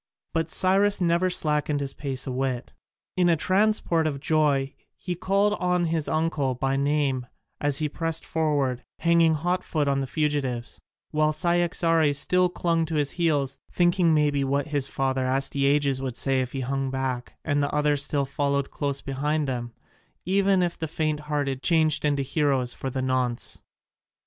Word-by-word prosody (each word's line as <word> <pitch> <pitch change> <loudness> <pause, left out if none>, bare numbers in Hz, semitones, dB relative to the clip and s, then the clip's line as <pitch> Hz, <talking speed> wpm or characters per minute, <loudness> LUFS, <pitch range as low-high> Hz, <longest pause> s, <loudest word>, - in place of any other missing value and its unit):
But 165 0 0
Cyrus 195 +4 +3
never 175 +1 +2
slackened 150 -3 0
his 140 -1 -3
pace 135 -3 -3
a 130 - -3
whit: 130 -1 -3 0.4
in 180 -1 +3
a 170 - +4
transport 185 -2 +2
of 140 -3 -3
joy 145 -3 +1 0.2
he 180 - -4
called 200 +4 +1
on 180 -1 +1
his 160 -2 -1
uncle 155 -5 0
by 135 +2 -1
name 140 -3 0 0.3
as 145 -1 0
he 155 - 0
pressed 165 +2 -3
forward, 145 -6 0
hanging 170 -1 +3
hot 175 +4 -1
foot 150 -3 -1
on 140 0 +1
the 135 - -2
fugitives, 140 -6 -2 0.3
while 155 0 +2
Cyaxares 165 -2 +2
still 180 +5 +2
clung 170 -2 0
to 160 - -3
his 145 -2 +1
heels, 150 -6 0
thinking 175 -1 +3
maybe 145 -2 +2
what 140 +2 -1
his 145 -2 0
father 130 -2 -1
Astyages 140 +1 +1
would 130 -3 -4
say 135 -1 +2
if 125 -1 -5
he 135 - -3
hung 135 +1 -2
back, 130 -2 -3
and 145 -1 +1
the 145 - -1
others 150 -1 +2
still 140 -1 0
followed 140 0 -1
close 140 -2 -2
behind 145 +2 -1
them, 120 -2 -3 0.5
even 195 +1 +2
the 170 -2 -2
faint 155 -1 -1
hearted 145 -3 -2
changed 155 -3 +3
into 145 -2 +1
heroes 135 -3 0
for 135 - -5
the 130 0 -3
nonce. 130 -2 -1
145 Hz, 165 wpm, -25 LUFS, 135-165 Hz, 0.5 s, a